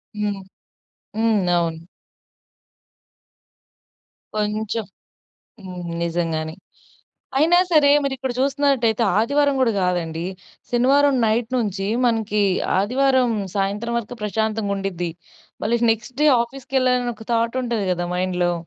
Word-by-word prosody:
హ్మ్. 205 -2 -2 0.8
హ్మ్. 220 -2 +2 0.2
అవును. 165 -1 -2 2.5
కొంచెం 215 +1 -2 0.8
హ్మ్. 180 -2 -7
నిజంగానే. 165 -2 -2 0.8
అయినా 330 +4 +5
సరే 295 -3 +6
మీరు 275 -1 -1
ఇక్కడ 260 -1 -3
జూస్తున్నట్ట‌యితే 270 -4 +2 0.2
ఆదివారం 285 +5 +2
గూడా 245 -3 +3
గాదండి. 170 -2 -1 0.5
శనివారం 275 +4 +4
నైట్ 225 +1 +1
నుంచీ 200 -4 -1 0.2
మనకీ 220 -3 +1 0.4
ఆదివారం 255 +4 +2 0.3
సాయంత్రం 205 +4 -1
వరకు 235 +1 -7
ప్రశాంతంగా 215 0 -1
ఉండిద్ది. 180 -3 -3 0.5
మళ్ళీ 235 +3 +1
నెక్స్ట్ 230 +3 -8
డే - - +5 0.2
ఆఫీస్‌కెళ్ళాలని 255 -1 -1
ఒక 220 - -12
థాట్ 230 +2 +1
ఉంటది 235 -5 -1
గదా! 175 0 -2
మైండ్‌లో. 180 -1 0
220 Hz, 105 wpm, -22 LUFS, 195-250 Hz, 2.5 s, సరే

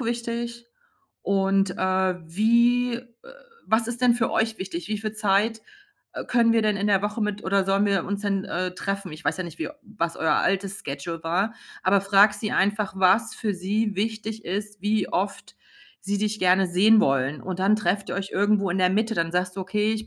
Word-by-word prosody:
wichtig 235 0 -4 0.6
und, 195 0 +1
äh, 185 0 +1
wie, 235 +7 +3
äh 240 +1 -6 0.7
was 225 +1 +3
ist 240 0 -5
denn 250 -1 +4
für 230 -2 0
euch 220 0 0
wichtig? 180 -2 -5
Wie 215 -1 -2
viel 215 0 -4
Zeit, 215 +1 +1 0.5
äh, - - -6
können 235 -2 +3
wir 230 - +3
denn 210 -1 +1
in 200 +1 -1
der 200 -1 +3
Woche 210 +2 -2
mit 210 0 -3
oder 195 0 +2
sollen 195 +2 +2
wir 195 -3 +1
uns 200 +1 -3
denn, 195 -2 -1
äh, 180 0 -3
treffen?“ 195 -3 -4
Ich 155 +2 -11
weiß 145 +2 0
ja 185 - -2
nicht, 170 -1 -10
wie - - -2
was 210 -8 -4
euer 160 - +1
altes 195 0 0
Schedule 150 +4 -5
war, 190 +7 0 0.3
aber 195 +1 +4
frag 200 +1 +5
sie 210 0 -4
einfach, 205 0 0
was 195 +4 +3
für 210 -3 -2
sie 205 +4 -1
wichtig 220 +1 -3
ist, 205 +2 -4
wie 210 -1 0
oft 195 +2 -3 0.5
sie 200 +1 -2
dich 215 +1 -1
gerne 185 +1 +4
sehen 200 +5 +5
wollen. 135 0 +1
Und 185 0 -5
dann 200 +3 +4
trefft 200 -1 -1
ihr - - -3
euch 195 0 -4
irgendwo 200 -1 +2
in 185 - -1
der 185 -1 +3
Mitte. 220 +3 0
Dann 165 -3 0
sagst 180 +1 -1
du: - - -3
„Okay, 210 +3 0
ich 220 0 -4
200 Hz, 205 wpm, -24 LUFS, 185-220 Hz, 0.7 s, frag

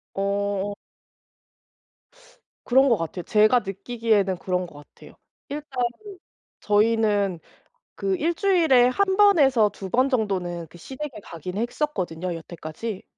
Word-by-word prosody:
어. 200 0 -1 1.9
그런 265 +2 +4
것 230 - +4
같아요. 165 +1 -5
제가 215 +6 +4
느끼기에는 205 -1 -1
그런 180 -1 -1
것 145 -3 -13
같아요. - - -15 0.4
일단 280 -4 -3 0.8
저희는 210 -3 +2 0.6
그 390 -1 -1
1 340 +1 0
주일에 325 -11 +4
1 380 +8 +1
번에서 280 - +5
2 195 -1 -8
번 255 +7 +2
정도는 185 -8 -2
그 175 - -16
시댁에 265 - -7
가긴 180 +3 -7
했었거든요 185 - -2
여태까지. 170 +5 -7
210 Hz, 230 characters per minute, -24 LUFS, 185-260 Hz, 1.9 s, 번에서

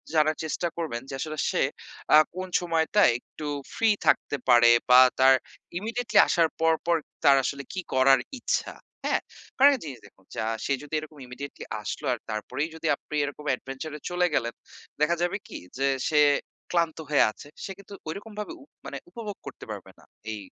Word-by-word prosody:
জানার 155 0 +3
চেষ্টা 160 +2 -1
করবেন 155 -9 -3
যে, - - -6
আসলে 155 +2 -4
সে - - +1 0.5
আ - - +10 0.2
কোন 185 0 -4
সময়টায় 165 - +3
একটু 150 +4 -9 0.3
ফ্রি 225 - +2 0.2
থাকতে 145 - +3
পারে 120 -1 +7 0.2
বা 125 +1 +9 0.2
তার 130 0 +7 0.4
ইমিডিয়েটলি 230 +3 -1
আসার 165 -2 +3
পর, 165 0 +4
পর, 170 0 +3 0.3
তার 140 - +8
আসলে 140 +1 -3
কী 185 - -2
করার 130 +1 +6 0.2
ইচ্ছা, - - -1 0.3
হ্যাঁ? - - +1 0.4
কারণ 275 +2 +8
একটা 265 - -4
জিনিস 135 -5 -7
দেখুন, 95 -1 -20
যা - - -2 0.2
সে 140 - +1
যদি 150 - -13
এরকম 155 0 -11
ইমিডিয়েটলি 125 +3 -8 0.2
আসলো - - -5
আর - - -5
তারপরেই 110 +8 -3
যদি 160 0 -4
আপনি 150 - -9
এরকম 145 +1 -6
এডভেঞ্চার 135 +5 -7
এ - - -15
চলে 180 0 +2
গেলেন, 115 -1 0 0.5
দেখা 160 +3 +3
যাবে 175 +3 0
কি - - -7 0.2
যে 135 +1 +1 0.2
সে 150 - +3 0.5
ক্লান্ত 170 -2 +1
হয়ে 145 - +5
আছে, 125 - -13 0.2
সে - - -5
কিন্তু 200 0 -13 0.2
ঐরকমভাবে 210 - -6
উপ 280 - -23 0.2
মানে - - -5
উপভোগ 225 - -7
করতে - - -9
পারবে - - -8
না - - -20 0.3
এই 105 - -5
155 Hz, 180 wpm, -27 LUFS, 135-180 Hz, 0.5 s, আ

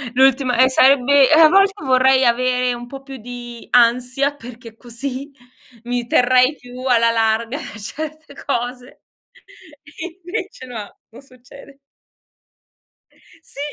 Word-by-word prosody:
L'ultima 260 -1 +3
eh 260 - +5
sarebbe 270 +1 +4
eh, 315 +1 +5
a 315 - +8
volte 390 +1 +4
vorrei 260 0 +3
avere 250 +1 +1
un 240 0 -8
po' 270 +1 -10
più 270 -1 -10
di 240 0 -10
ansia 250 +4 +2
perché 230 -3 -12
così, 260 +4 -7 0.5
mi 245 0 -3
terrei 255 +4 +3
più 250 0 -12
alla 230 -2 +3
larga 225 +3 0 0.2
certe 310 +7 -8
cose. 250 -1 -5 1.2
Invece 360 -6 -6
no, 220 -4 -9
non 230 - -15
succede. 275 +1 -17 1.7
Sì! - - -12
255 Hz, 120 wpm, -19 LUFS, 240-275 Hz, 1.7 s, a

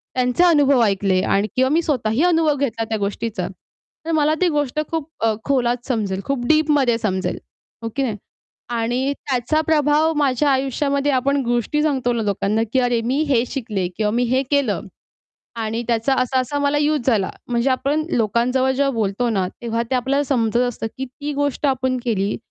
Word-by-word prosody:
त्यांचे 250 +6 +2
अनुभव 290 -7 +4
ऐकले 195 -3 +1
आणि 200 +2 +1
किंवा 260 +1 +3
मी 320 +3 +3
स्वतःही 255 -3 0
अनुभव 325 -4 +3
घेतला 245 -5 -2
त्या 220 - 0
गोष्टीचा, 210 +2 -3 0.6
तर 330 - -2
मला 310 -1 +2
ती 365 - +4
गोष्ट 295 -2 -1
खूप 320 -2 -3 0.2
अ, 225 - +3
खोलात 245 -3 0
समजेल, 205 -6 -1
खूप 260 -3 -2
डीपमध्ये 295 -6 +3
समजेल, 190 -4 -2 0.5
हो 230 - -2
की 275 - 0
नाही? 225 -5 -1 0.5
आणि 245 +4 -1
त्याचा 275 +3 -1
प्रभाव 305 +1 +3
माझ्या 285 0 +2
आयुष्यामध्ये 275 +2 0
आपण 275 +2 +1
गोष्टी 240 +5 0
सांगतो 265 -5 +1
ना 230 - -1
लोकांना 205 +1 0
की 260 - +4
अरे, 245 -2 +1
मी 250 +5 -1
हे 240 -4 +3
शिकले 220 -9 -3
किंवा 210 -1 +1
मी 240 +3 +1
हे 255 +2 +1
केलं 255 - +1 0.8
आणि 225 +1 -2
त्याचा 235 +3 +1
असा-असा 260 +2 -1
मला 285 0 +1
युज 295 -3 0
झाला. 215 -7 +2 0.2
म्हणजे 240 +2 +1
आपण 285 +4 0
लोकांजवळ 245 +3 +1
जेव्हा 275 +1 +1
बोलतो 220 +2 0
ना, 195 -4 0 0.2
तेव्हा 230 0 -1
ते - - +1
आपल्याला 265 +3 +1
समजत 235 -5 0
असतं 225 -2 -4
की 265 - -2
ती 290 +4 -6
गोष्ट 285 0 -1
आपण 260 -1 0
केली, 205 -4 0
255 Hz, 175 wpm, -21 LUFS, 230-285 Hz, 0.8 s, अनुभव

